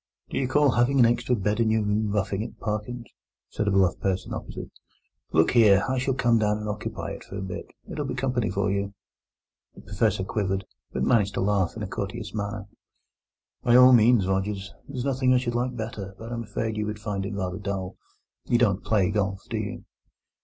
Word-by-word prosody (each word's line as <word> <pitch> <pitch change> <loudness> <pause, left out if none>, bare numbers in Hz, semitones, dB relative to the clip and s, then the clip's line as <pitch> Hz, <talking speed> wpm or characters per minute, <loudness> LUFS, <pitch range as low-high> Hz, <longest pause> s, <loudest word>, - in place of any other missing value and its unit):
"Do - - -1
you 135 - 0
call 145 +1 +4
having 120 +3 +2
an 120 - +8
extra 120 +1 +2
bed 105 +1 -1
in 115 -1 +3
your 110 0 +2
room 105 +1 0
roughing 100 -1 0
it, 115 - -7
Parkins?" 110 +3 -3 0.4
said 105 - -2
a - - +3
bluff 95 -2 +3
person 95 -1 -1
opposite. - - -7 0.6
"Look 80 +1 +4
here, 105 -5 +6
I 130 -1 0
shall 130 0 0
come 120 -3 +3
down 105 -1 +2
and 105 0 -5
occupy 105 0 -4
it - - -7
for 100 - -8
a - - -4
bit; 95 -2 -6 0.2
it'll 150 -2 -4
be - - -3
company 125 -4 0
for 100 +1 0
you." 100 0 -2 0.8
The - - -12
Professor 95 - 0
quivered, 95 -1 -1 0.3
but 65 - -2
managed 100 - +2
to - - 0
laugh 95 -2 +1
in - - -4
a - - -3
courteous - - -5
manner. 105 -1 -3 1.0
"By 120 - +4
all 125 +1 +9
means, 115 -3 +5
Rogers; 95 0 -2
there's 130 -2 -4
nothing 130 -2 +2
I - - +6
should 125 -1 -1
like 125 +1 -1
better. 110 -4 -6
But 115 +2 -8
I'm 115 -1 -4
afraid 110 +1 -3
you 105 0 -1
would 105 0 -3
find 105 -2 -3
it 100 +1 -4
rather 95 -1 -3
dull; 95 -2 -4 0.5
you 120 - +3
don't 100 -5 +2
play 100 -3 +2
golf, 100 -2 -1
do - - -1
you?" - - -5
105 Hz, 210 wpm, -26 LUFS, 100-120 Hz, 1.0 s, all